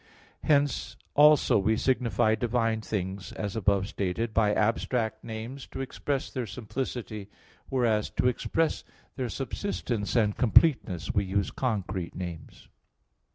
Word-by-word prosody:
Hence 145 -2 +1 0.2
also 150 -5 +6
we 110 +3 +2
signify 120 -4 +2
divine 115 -1 0
things, 95 -2 -4
as 105 -2 -4
above 100 -2 +2
stated, 105 +4 -2
by 105 -2 +3
abstract 115 +2 0
names, 115 +4 -6
to - - -8
express 135 +1 -3
their 125 -3 -3
simplicity; 110 -1 -5 0.4
whereas, 115 -5 +1
to - - +3
express 160 +6 0 0.3
their 130 -3 -2
subsistence 125 - -3
and 105 -3 +3
completeness, 120 - +3
we 100 - +1
use 100 +1 0
concrete 95 -8 -2
names. 85 -4 -7
110 Hz, 120 wpm, -28 LUFS, 100-125 Hz, 0.4 s, also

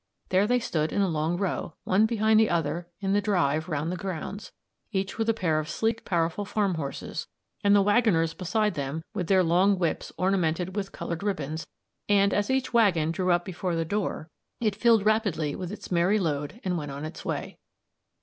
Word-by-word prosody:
There 190 +2 +3
they 245 +2 +3
stood 160 -10 -1
in 200 - +2
a - - +2
long 160 +1 0
row, 180 -3 -2
one 205 +4 +3
behind 220 -1 +3
the 220 - +4
other 170 +1 -1
in 195 0 0
the 205 - +3
drive 175 -5 +1
round 155 +1 -1
the - - -2
grounds, 190 +2 -5 0.4
each 195 +1 -2
with 225 0 +1
a - - +4
pair 165 -7 +1
of 155 0 -4
sleek, 225 +6 -1
powerful 170 +2 0
farm 200 -1 0
horses, 145 -4 -5 0.4
and 200 0 +5
the 200 - +5
waggoners 200 -7 +3
beside 210 +3 0
them 145 +1 -4
with 185 -6 -2
their 190 0 +4
long 185 +4 +3
whips 170 -3 -1
ornamented 180 -1 0
with 195 -2 -3
coloured 170 0 -5
ribbons; 160 -6 -3 0.4
and 200 -1 +4
as 205 0 0
each 265 -1 0
waggon 180 -9 +3
drew 180 +2 -1
up 175 0 +2
before 180 -1 -3
the 165 0 0
door, 195 -3 -2 0.3
it 215 -4 0
filled 225 -1 +4
rapidly 200 -9 +1
with 180 -1 -5
its 210 - -9
merry 180 +4 +3
load 155 +1 -2
and 180 -2 -1
went 145 -1 -5
on 140 +2 -5
its 155 - -8
way. - - -4
185 Hz, 200 wpm, -27 LUFS, 165-205 Hz, 0.4 s, and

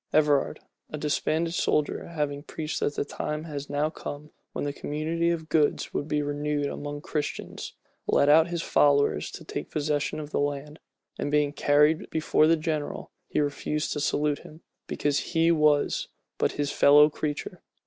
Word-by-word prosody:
Everard, 150 -2 +2 0.3
a 155 - -5
disbanded 155 +2 0
soldier, 150 -4 0
having 150 -4 -2
preached 155 +1 -4
that 145 - -1
the - - -1
time 150 +1 -4
was 145 -2 -6
now 145 +2 0
come 150 0 -8 0.2
when - - -3
the 145 - -2
community 160 +4 -1
of 165 -2 -2
goods 155 -3 +1
would 145 - -2
be 150 -1 0
renewed 145 0 -1
among 145 +1 -5
Christians, 150 -1 -4 0.3
led 140 - +3
out 160 +3 +6
his 170 -1 -3
followers 140 -1 +3
to - - -9
take - - -5
possession 150 0 -1
of 150 -1 -7
the - - 0
land; 145 +1 -3 0.4
and - - -1
being 145 0 +2
carried 150 +2 +3
before 155 -1 +3
the 165 +1 +4
general, 155 -2 -3 0.2
he - - -1
refused 150 +1 -1
to 150 - -3
salute 145 0 0
him, 155 +2 -14 0.3
because 145 -1 0
he 165 0 +2
was 150 -3 +2 0.3
but - - +1
his 145 -1 -1
fellow 145 +1 +7
creature. 150 -1 -4
150 Hz, 170 wpm, -27 LUFS, 145-155 Hz, 0.4 s, fellow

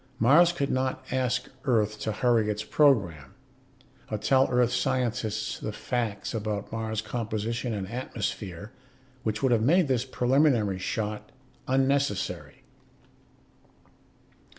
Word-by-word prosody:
Mars 150 +10 +6
could 140 -5 -2
not 130 0 -1
ask 125 -1 0 0.2
Earth 110 -5 +1
to 110 - -2
hurry 115 -1 +2
its 105 0 -2
program. 105 - +2 0.7
Or 110 - -2
tell 130 +5 +3
Earth 125 -1 +2
scientists 115 -4 -1
the 110 - -4
facts 115 -2 -3
about 105 -2 -3
Mars' 110 -1 -3
composition 115 +1 -3
and 100 -3 -3
atmosphere 105 -4 -5 0.5
which 110 0 -3
would 130 - +3
have 115 -2 +3
made 165 +8 +4
this 130 -3 +1
preliminary 125 -6 +2
shot 105 +2 -3 0.4
unnecessary. 135 -3 0
115 Hz, 115 wpm, -27 LUFS, 105-130 Hz, 0.7 s, Mars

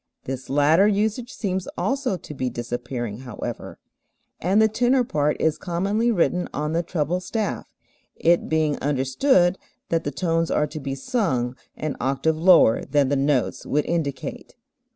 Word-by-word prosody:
This 130 0 -6
latter 150 +8 +4
usage 215 +4 0
seems 190 -3 -3
also 270 -7 0
to 150 - -10
be 130 -3 -2
disappearing 120 -2 -4
however, 125 -4 -7 0.6
and 190 +5 +2
the 220 - +6
tenor 245 +4 +2
part 150 -8 0
is 160 -1 +1
commonly 195 +6 0
written 180 -3 +1
on 150 +2 -2
the 170 - +2
treble 170 0 -1
staff, 210 +4 -3 0.4
it 170 +1 +2
being 155 -2 +1
understood 160 - +2 0.3
that 165 -1 +1
the - - -2
tones 165 +3 0
are 150 - +2
to 155 +1 -7
be 135 -1 -4
sung 135 - -1 0.2
an 155 -2 -3
octave 135 +5 +1
lower 170 -9 +6
than 145 -3 +1
the 140 - +2
notes 135 -2 0
would 150 +1 0
indicate. 150 -6 -3
160 Hz, 150 wpm, -23 LUFS, 135-190 Hz, 0.6 s, the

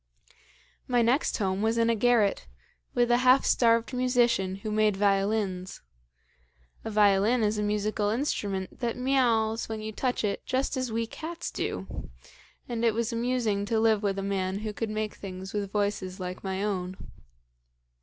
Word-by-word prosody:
"My 245 -2 +3
next 250 +6 +2
home 195 -2 -1
was 225 +1 +1
in 230 0 +3
a 230 - +3
garret, 225 -2 +2 0.5
with 240 -1 +3
a 240 - +5
half 255 +2 +5
starved 230 +1 +3
musician 240 -7 +2
who 205 +2 -5
made 215 -2 +2
violins. 195 -2 0 1.0
A - - -4
violin 210 +2 +3
is 210 0 +1
a - - 0
musical 210 0 0
instrument 205 -6 -2
that 240 -1 -2
miauls 235 -4 +1
when 220 -1 -3
you 215 0 -5
touch 250 +3 -1
it 200 -1 -1
just 265 +2 -1
as 255 -2 -2
we 230 +1 -1
cats 325 +8 -6
do, - - -5 0.6
and 235 -1 -3
it 230 -2 +3
was 235 0 -1
amusing 230 -4 0
to 225 +1 0
live 220 -2 +3
with 200 -2 -1
a 195 - -2
man 195 -1 -1
who 215 - -3
could 225 +1 -3
make 215 0 -2
things 190 -1 -8
with 200 -2 -3
voices 200 -2 -2
like 180 0 -6
my 190 0 -2
own. 185 -3 -2
215 Hz, 165 wpm, -28 LUFS, 200-235 Hz, 1.0 s, a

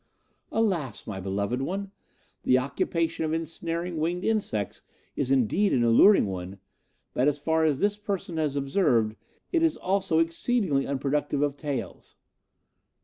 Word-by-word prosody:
Alas, 180 - -1
my 100 -3 -5
beloved 100 +6 -2
one! 195 +7 -3 0.5
the 130 - +4
occupation 160 +5 -1
of 155 0 -1
ensnaring 165 +1 -3
winged 170 +4 -1
insects 205 - -1 0.3
is 135 - -1
indeed 135 - +2
an 120 - +3
alluring 120 - +6
one, 95 0 -5 0.6
but 130 - +2
as 145 -1 +2
far 160 +2 +1
as 150 -4 +2
this 205 0 +2
person 195 -5 -4
has 150 -3 0
observed, 135 - +2 0.4
it 335 - +2
is 325 -1 +2
also 190 -3 0
exceedingly 165 - +1
unproductive 140 +1 0
of 145 -1 0
taels. 145 -2 -5
155 Hz, 140 wpm, -27 LUFS, 130-185 Hz, 0.6 s, alluring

